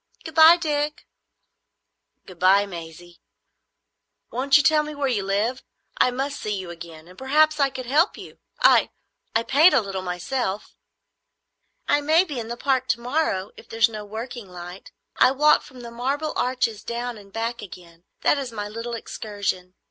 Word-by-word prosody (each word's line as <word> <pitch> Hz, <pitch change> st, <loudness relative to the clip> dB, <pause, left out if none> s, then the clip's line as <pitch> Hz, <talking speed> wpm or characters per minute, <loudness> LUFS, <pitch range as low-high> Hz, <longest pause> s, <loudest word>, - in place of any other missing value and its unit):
Good 320 Hz, -, -8 dB
bye, 320 Hz, +2 st, +8 dB
Dick." 300 Hz, -3 st, -2 dB, 1.2 s
"Good 180 Hz, -2 st, -14 dB
bye, 195 Hz, +2 st, +5 dB
Maisie. 170 Hz, -1 st, -10 dB, 1.1 s
Won't 265 Hz, +3 st, +3 dB
you 290 Hz, -, +2 dB
tell 305 Hz, +2 st, +4 dB
me 300 Hz, 0 st, -7 dB
where 285 Hz, -1 st, -1 dB
you 235 Hz, -6 st, 0 dB
live? 205 Hz, +6 st, -1 dB, 0.4 s
I -, -, +4 dB
must 270 Hz, +3 st, -3 dB
see 210 Hz, -1 st, -3 dB
you 185 Hz, -2 st, -6 dB
again; 165 Hz, -1 st, -11 dB
and 180 Hz, -, -15 dB
perhaps 305 Hz, +5 st, +2 dB
I 275 Hz, -1 st, +3 dB
could 260 Hz, -1 st, -7 dB
help 300 Hz, -, +2 dB
you. -, -, -12 dB, 0.2 s
I—I 230 Hz, -, +1 dB
paint 300 Hz, +7 st, +5 dB
a -, -, +6 dB
little 195 Hz, -3 st, -4 dB
myself." 190 Hz, +4 st, -3 dB, 1.1 s
"I 290 Hz, -, +3 dB
may 315 Hz, +4 st, +4 dB
be 295 Hz, -9 st, -5 dB
in 225 Hz, -, -5 dB
the 235 Hz, +1 st, -5 dB
Park 260 Hz, -1 st, 0 dB
to 235 Hz, -, 0 dB
morrow, 235 Hz, -7 st, -1 dB
if -, -, -15 dB
there 225 Hz, -, -8 dB
is 225 Hz, 0 st, +5 dB
no 215 Hz, -2 st, -7 dB
working 225 Hz, +1 st, -7 dB
light. 180 Hz, +1 st, -10 dB, 0.3 s
I -, -, +6 dB
walk 300 Hz, +2 st, +4 dB
from 255 Hz, -1 st, -13 dB
the 235 Hz, -1 st, -9 dB
Marble 275 Hz, +6 st, -2 dB
Arch 250 Hz, 0 st, +1 dB, 0.2 s
down 240 Hz, +1 st, -4 dB
and 200 Hz, -1 st, -16 dB
back 230 Hz, +2 st, -3 dB
again; 170 Hz, -3 st, -12 dB, 0.2 s
that 290 Hz, -, +3 dB
is 265 Hz, -3 st, -5 dB
my 205 Hz, -2 st, -5 dB
little 230 Hz, +3 st, -5 dB
excursion. 200 Hz, -5 st, -4 dB
235 Hz, 175 wpm, -23 LUFS, 195-280 Hz, 1.2 s, bye